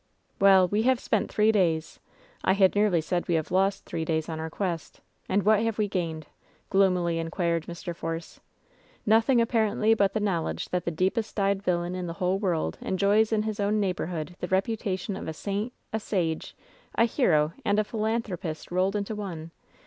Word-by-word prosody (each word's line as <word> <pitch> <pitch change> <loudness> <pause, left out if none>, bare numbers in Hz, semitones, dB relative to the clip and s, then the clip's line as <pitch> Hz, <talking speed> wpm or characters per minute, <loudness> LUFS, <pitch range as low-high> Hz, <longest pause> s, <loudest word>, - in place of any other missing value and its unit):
*Well, 195 -2 +6
we 205 +4 +1
have 255 +1 +3
spent 215 - -1
three 215 +1 +4
days 165 -6 0 0.2
— - - -29
^I - - +3
had 190 -2 +4
nearly 205 -5 +3
said 175 +2 -2
we 170 - +2
have 160 0 -2
lost 195 +2 +1
three 165 - -3
days 160 0 -1
on 160 -1 -4
our 160 0 -4
quest 170 -1 -4
— - - -40
and 195 +1 +2
what 215 0 +4
have 225 -1 -1
we 210 -1 +1
gained 165 -5 -3 0.2
?" - - -36
gloomily 180 -3 +2
inquired 165 0 -1
Mr. 170 0 -6
Force. 165 0 -5 0.7
"Nothing 225 +4 +4
ap 230 0 +2
parently 220 -1 +2
but 200 -2 +2
the 220 - 0
knowledge 190 -6 -1
that 180 -1 -2
the - - +1
deepest 190 +7 -1
dyed 200 -1 +1
villain 175 -2 -1
in 180 -1 -4
the 170 - -4
whole 185 0 0
world 170 - -1
enjoys 205 +3 +2
in 215 -1 +2
his 215 -1 -3
own 205 +1 +1
neighborhood 175 -3 -2
the 180 - -3
reputation 195 0 -1
of - - -6
a 160 - -3
saint, 205 +7 -3 0.2
a 220 - 0
sage, 170 -7 -2 0.4
a 230 - +5
hero 165 - +2
and 205 - +1
a 215 - +3
philanthropist 210 -8 -3
rolled 185 +3 +1
into 205 +1 -2
one 170 -6 -6
190 Hz, 195 wpm, -27 LUFS, 170-210 Hz, 0.7 s, Well